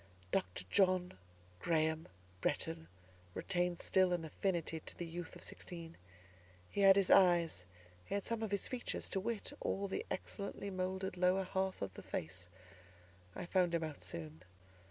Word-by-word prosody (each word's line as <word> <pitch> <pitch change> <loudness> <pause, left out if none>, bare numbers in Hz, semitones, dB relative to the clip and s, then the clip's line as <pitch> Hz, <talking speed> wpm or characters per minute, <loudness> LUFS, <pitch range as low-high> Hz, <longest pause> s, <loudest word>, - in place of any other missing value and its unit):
Dr. 90 0 0
John 185 -2 +4 0.5
Graham 160 -1 +1 0.3
Bretton 80 0 0 0.5
retained 175 -2 0
still 185 -1 +4
an 170 -2 -1
affinity 165 -1 -1
to - - -11
the 175 - -3
youth 170 +1 -6
of - - -10
sixteen: 170 -2 -6 0.8
he 200 - 0
had 195 -1 +9
his 195 -2 +4
eyes; 170 - +6 0.4
he 200 - -3
had 200 - -1
some 230 -1 -1
of 220 - -1
his 200 0 0
features; 255 -2 -3
to 195 - +1
wit, 225 +2 -2
all 200 +1 0
the 195 - -2
excellently 200 +1 -4
moulded 185 0 -2
lower 185 +2 +4
half 190 - -1
of 95 -1 -4
the - - -8
face; 90 +2 -4 0.9
I - - -4
found 175 -1 +3
him 165 - +1
out 155 -2 -5
soon. 80 -1 -5
180 Hz, 155 wpm, -37 LUFS, 160-190 Hz, 0.9 s, had